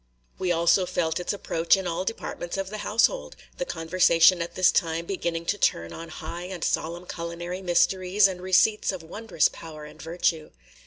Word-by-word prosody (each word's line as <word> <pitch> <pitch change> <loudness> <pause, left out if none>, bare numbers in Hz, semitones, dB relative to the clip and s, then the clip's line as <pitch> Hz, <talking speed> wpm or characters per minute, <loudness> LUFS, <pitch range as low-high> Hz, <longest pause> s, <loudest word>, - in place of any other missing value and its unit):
We 185 -1 0
also 170 +2 +3
felt 165 -2 -1
its 180 - -2
approach 170 -3 +1
in 190 - -4
all 175 +1 -2
departments 190 -4 -5
of 195 0 -4
the 215 - -5
household, 230 - +1
– - - -31
the - - -1
conversation 170 - +4
at 170 0 -5
this 185 -1 +5
time 165 0 0
beginning 170 -3 -3
to 205 +4 -1
turn 85 - 0
on 165 0 -8
high 175 +1 -7
and 180 -2 -6
solemn 170 +3 -2
culinary 175 +2 -5
mysteries 185 +2 +3
and 185 -2 -6
receipts 190 +4 +3
of 185 -4 -7
wondrous 175 0 0
power 155 -2 -10
and 150 0 -13
virtue. 165 0 -1
175 Hz, 180 wpm, -26 LUFS, 165-190 Hz, -, this